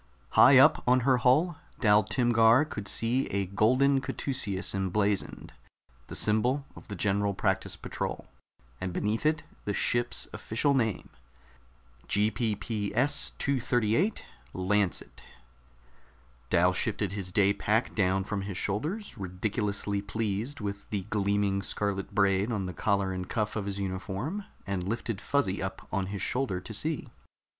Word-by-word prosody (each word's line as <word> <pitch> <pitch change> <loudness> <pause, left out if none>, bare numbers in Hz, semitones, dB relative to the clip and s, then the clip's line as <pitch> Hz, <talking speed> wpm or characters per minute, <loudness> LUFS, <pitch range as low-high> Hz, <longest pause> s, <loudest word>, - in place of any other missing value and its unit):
High 130 +1 +7
up 150 +4 +6
on 125 +1 +5
her 130 +1 +3
hull 150 +8 +3 0.2
Dal 105 -3 +5
Timgar 115 +4 +4
could 105 -9 -6
see 120 +7 +1
a 100 0 -1
golden 130 +8 +3
caduceus 105 -9 -2
emblazoned, 100 +1 -1 0.5
the - - -7
symbol 125 +6 +2
of - - -13
the 105 - -6
General 100 +1 0
Practice 95 -1 0
Patrol, - - -5 0.5
and 95 -1 -4
beneath 110 - 0
it 155 0 +1 0.2
the 105 - -1
ship's 120 0 +1
official 140 +6 0
name: 115 -6 0 1.0
GPPS 110 +4 0
238 130 - +1 0.3
LANCET 95 0 0 1.3
Dal 90 +1 +4
shifted 100 0 -1
his 95 -2 -4
day 100 0 +3
pack 110 +4 0
down 95 -1 +1
from 100 0 -3
his 95 -2 -5
shoulders, 150 - -3
ridiculously 100 +2 -1
pleased 110 +5 -3
with 100 -1 -5
the 100 -3 -2
gleaming 100 -1 +1
scarlet 100 -1 -2
braid 100 +2 +2
on 100 -4 -1
the 90 - -5
collar 100 +1 0
and 90 -1 -5
cuff 110 -2 -1
of 105 -2 -3
his 100 -1 -3
uniform, 100 - -4 0.2
and 100 -2 -2
lifted 115 -2 -3
Fuzzy 140 -10 0
up - - -5
on 95 -1 -1
his 100 0 -4
shoulder 125 -8 -1
to 110 - -9
see. 150 +4 -1
105 Hz, 135 wpm, -29 LUFS, 100-125 Hz, 1.3 s, High